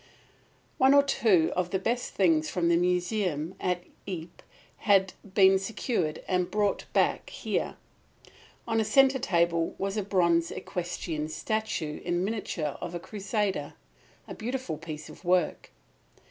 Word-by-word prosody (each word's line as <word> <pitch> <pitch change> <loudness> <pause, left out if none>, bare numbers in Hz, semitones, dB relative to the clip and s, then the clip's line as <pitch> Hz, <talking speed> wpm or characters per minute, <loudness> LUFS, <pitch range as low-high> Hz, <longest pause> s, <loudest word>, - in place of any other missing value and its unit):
One 265 +2 +6
or 280 - +7
two 210 - +3
of 180 -1 0
the 190 - 0
best 235 +6 -2
things 160 -5 +3
from 170 -2 +1
the 170 - +4
museum 180 -2 0
at 180 -1 -1 0.2
Ypres 175 -3 -6 0.4
had 195 -2 +3 0.2
been 190 -1 +6
secured 190 - -2
and 180 -1 +1
brought 205 -1 0
back - - +1
here. - - -2 0.9
On 225 - +1
a - - +3
centre 270 +3 +4
table 170 -7 +1
was 195 +2 -2
a - - +1
bronze 170 -4 +2
equestrian 170 -3 -4
statue 180 -5 -2
in 175 +1 0
miniature 190 -8 -3
of 175 0 -5
a - - -3
Crusader, 205 +1 -2 0.5
a - - -6
beautiful 235 - -4
piece 155 -2 -7
of - - -13
work. 180 -2 +1
185 Hz, 140 wpm, -28 LUFS, 170-210 Hz, 0.9 s, or